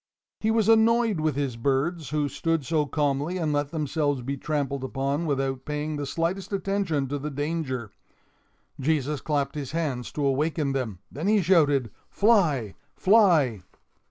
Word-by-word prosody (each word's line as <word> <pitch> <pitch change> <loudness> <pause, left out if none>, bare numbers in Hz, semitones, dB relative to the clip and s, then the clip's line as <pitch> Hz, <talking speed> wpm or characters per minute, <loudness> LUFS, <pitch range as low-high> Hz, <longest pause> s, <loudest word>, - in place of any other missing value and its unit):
He 220 - 0
was 220 -2 +2
annoyed 225 -3 +4
with 155 -3 0
his 140 -4 -2
birds, 140 +4 0
who 150 0 0
stood 165 +1 -1
so 150 0 +1
calmly 145 +4 0
and 160 -4 0
let 145 -1 0
themselves 145 -3 -1
be 140 +3 -2
trampled 140 -1 -2
upon 140 +4 -2
without 135 -2 -1
paying 150 +1 -3
the 145 -1 -4
slightest 170 +7 -2
attention 195 -8 -1
to 145 +1 -2
the 150 +2 -4
danger. 145 -6 -3 0.9
Jesus 145 0 0
clapped 140 -3 -1
his 145 -2 -5
hands 145 -7 -2
to 145 - -1
awaken 145 +1 0
them; 125 -8 -2
then 155 +8 -4
he 215 0 +4
shouted: 145 - +3 0.2
"Fly, 165 - +2 0.2
fly!" 170 - +4
150 Hz, 155 wpm, -26 LUFS, 135-165 Hz, 0.9 s, annoyed